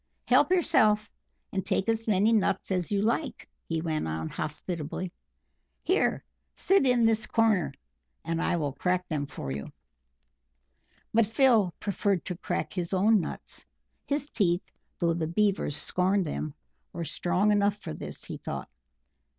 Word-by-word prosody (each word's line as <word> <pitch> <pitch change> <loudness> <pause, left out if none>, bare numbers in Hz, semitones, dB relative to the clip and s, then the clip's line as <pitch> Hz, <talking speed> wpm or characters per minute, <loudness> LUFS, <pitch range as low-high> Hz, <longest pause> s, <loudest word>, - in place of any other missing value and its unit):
Help - - +5
yourself, 225 - +3 0.4
and 190 -1 -1
take 190 +2 0
as 225 0 0
many 210 +2 +4
nuts 195 -3 +1
as 180 -1 -1
you 200 0 +1
like," 230 +2 -1 0.2
he 165 -1 0
went 155 - -1
on 80 0 -3
hospitably. 155 +3 -4 0.7
"Here - - +1 0.3
sit 385 -8 +3
in 245 -2 +4
this 225 0 +2
corner, 220 -6 +2 0.5
and 165 0 -1
I - - +1
will 145 -5 -1
crack 180 +5 0
them 145 -3 -2
for 70 - -6
you." 70 +1 -5 1.4
But 225 -1 +4
Phil 225 -5 +4
preferred 200 -2 0
to 180 - -3
crack - - -3
his 180 -1 -3
own 210 +3 +4
nuts; 160 - -7 0.4
his 285 0 -1
teeth, 185 - +1 0.3
though 170 -1 +2
the 165 -1 -1
Beavers 190 -4 +1
scorned 185 +1 +1
them, 150 -1 -4 0.4
were 170 - -4
strong 180 +6 +1
enough 205 0 +2
for 210 - -7
this, - - -7
he - - -6
thought. - - -6
190 Hz, 150 wpm, -28 LUFS, 170-215 Hz, 1.4 s, Help